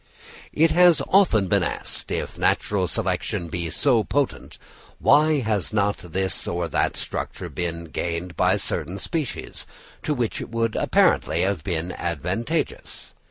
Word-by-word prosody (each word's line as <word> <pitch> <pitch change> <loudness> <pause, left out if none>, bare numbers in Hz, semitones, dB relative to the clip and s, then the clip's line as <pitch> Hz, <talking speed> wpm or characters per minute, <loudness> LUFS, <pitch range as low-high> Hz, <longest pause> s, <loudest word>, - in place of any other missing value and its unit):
It 160 +2 +3
has 175 -2 +6
often 165 - +4
been - - +3
asked, - - -2
if - - -4
natural 95 -3 +1
selection 85 +1 -2
be 85 0 -3
so 120 - +2
potent, 140 +3 -2 0.4
why 150 +1 +4
has 105 -6 0
not 105 -1 +1
this 95 +2 -2
or 85 0 -1
that - - 0
structure - - -4
been 85 -1 -4
gained 85 +2 -4
by - - +3
certain 90 +6 -3
species, 155 - -4 0.3
to 150 - -1
which 120 -4 -2
it - - -7
would 115 -1 -1
apparently 80 +2 +2
have 95 -5 -1
been 85 0 -2
advantageous? 90 - -3
100 Hz, 140 wpm, -24 LUFS, 85-135 Hz, 0.4 s, has